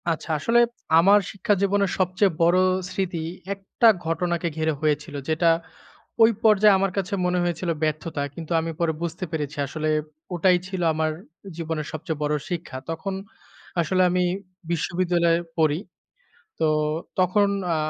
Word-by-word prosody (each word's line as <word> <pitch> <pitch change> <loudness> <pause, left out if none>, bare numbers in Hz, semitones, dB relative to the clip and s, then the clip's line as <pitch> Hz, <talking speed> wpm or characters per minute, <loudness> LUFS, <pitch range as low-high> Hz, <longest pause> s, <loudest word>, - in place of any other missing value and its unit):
আচ্ছা, 165 0 -3
আসলে 230 +9 +3 0.4
আমার 200 +4 +6
শিক্ষা 200 0 0
জীবনের 200 -1 +2
সবচেয়ে 185 +2 +2
বড়ো 175 +2 +5 0.3
স্মৃতি, 180 -4 -2 0.3
একটা 200 +4 +1 0.2
ঘটনাকে 170 +1 -1
ঘিরে 160 0 +1
হয়েছিল। 150 0 -1
যেটা 160 +2 +3 0.7
ওই 225 - +7
পর্যায়ে 210 -2 +6
আমার 195 0 0
কাছে 195 0 -2
মনে 180 0 +1
হয়েছিল 175 0 -2
ব্যর্থতা, 155 0 -2
কিন্তু 165 0 -8
আমি 165 0 -3
পরে 170 -2 +1
বুঝতে 170 +2 -3
পেরেছি 150 -2 -3
আসলে 155 +2 -2 0.4
ওটাই 180 +1 +4
ছিল 190 -1 -4
আমার 155 0 0 0.5
জীবনের 160 -2 -3
সবচেয়ে 155 0 -5
বড়ো 150 0 +1
শিক্ষা। 170 -6 -4
তখন 165 +4 -3 0.7
আসলে 185 +3 +1
আমি 180 0 +1 0.5
বিশ্ববিদ্যালয়ে 170 0 +1 0.2
পড়ি। 155 -1 +2 0.8
তো 160 - +3 0.5
তখন 200 +3 +3 0.3
আ - - +1
170 Hz, 135 wpm, -24 LUFS, 160-185 Hz, 0.8 s, ওই